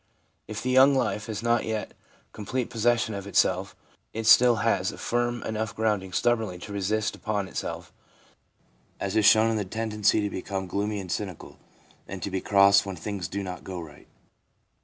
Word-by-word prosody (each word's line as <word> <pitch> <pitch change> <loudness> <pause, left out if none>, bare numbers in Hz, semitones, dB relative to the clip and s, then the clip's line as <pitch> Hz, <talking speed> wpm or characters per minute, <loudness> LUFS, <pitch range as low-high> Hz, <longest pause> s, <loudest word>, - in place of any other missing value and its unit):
If 105 -1 -6
the 130 - 0
young 135 +2 +6
life 105 -5 -1
has 110 0 -5
not 120 0 +2
yet 110 -1 -4 0.4
complete 120 +4 -3
possession 115 0 +1
of 100 0 -6
itself, 100 - +1 0.4
it 115 0 -4
still 120 +1 +7
has 95 -4 +2
firm 120 0 -1
enough 110 -1 -3
grounding 105 -4 -1
stubbornly 110 -3 0
to 100 +4 -9
insist 105 +2 -1
upon 105 -2 -2
itself, - - -6 1.1
as 100 +1 -3
is 110 -1 +5
shown 110 +1 +5
in 110 - 0
the 105 - -1
tendency 105 +1 0
to 105 - -1
become 95 +1 -4
gloomy 100 +3 -2
and 95 -3 -6
cynical, 95 -5 -5 0.5
and 95 -3 -7
to 100 - -3
be 95 0 -2
cross 100 0 +5
when 95 -1 -6
things 95 +1 -5
do 100 +3 -4
not 90 -1 -7
go 95 -2 -6
right. 75 -4 -12
105 Hz, 175 wpm, -26 LUFS, 95-115 Hz, 1.1 s, still